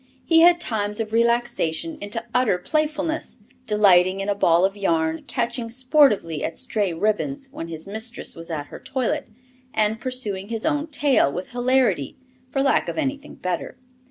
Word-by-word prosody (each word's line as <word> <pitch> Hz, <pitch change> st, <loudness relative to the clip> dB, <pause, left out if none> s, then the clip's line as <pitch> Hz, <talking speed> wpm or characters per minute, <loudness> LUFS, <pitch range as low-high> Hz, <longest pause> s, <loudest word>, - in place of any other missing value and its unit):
He 330 Hz, -1 st, +5 dB
had 345 Hz, +1 st, +6 dB
times 210 Hz, -7 st, -2 dB
of 220 Hz, -1 st, -3 dB
relaxation 235 Hz, -, 0 dB
into 225 Hz, +3 st, -4 dB
utter 250 Hz, -7 st, +3 dB
playfulness, 310 Hz, -, -2 dB, 0.3 s
delighting 195 Hz, -3 st, +4 dB
in 195 Hz, +1 st, -2 dB
a -, -, +3 dB
ball 175 Hz, -3 st, +3 dB
of 195 Hz, +1 st, -1 dB
yarn, 160 Hz, -5 st, 0 dB
catching 235 Hz, -1 st, -2 dB
sportively 245 Hz, -, +2 dB
at -, -, -3 dB
stray 215 Hz, -7 st, -1 dB
ribbons 215 Hz, -, -1 dB
when 165 Hz, -, -6 dB
his 160 Hz, -1 st, -6 dB
mistress 220 Hz, +4 st, -3 dB
was 165 Hz, 0 st, -9 dB
at 150 Hz, -3 st, -3 dB
her -, -, -10 dB
toilet, 270 Hz, +3 st, -2 dB, 0.5 s
and 215 Hz, +1 st, +1 dB
pursuing 215 Hz, -7 st, -3 dB
his 225 Hz, 0 st, -3 dB
own 305 Hz, 0 st, 0 dB
tail, 280 Hz, -, +2 dB
with 180 Hz, -, -6 dB
hilarity, 245 Hz, -, +1 dB, 0.3 s
for 270 Hz, +1 st, 0 dB
lack 275 Hz, -, +2 dB
of -, -, -5 dB
anything 285 Hz, -1 st, -3 dB
better. 180 Hz, -2 st, -4 dB
225 Hz, 160 wpm, -23 LUFS, 190-270 Hz, 0.5 s, had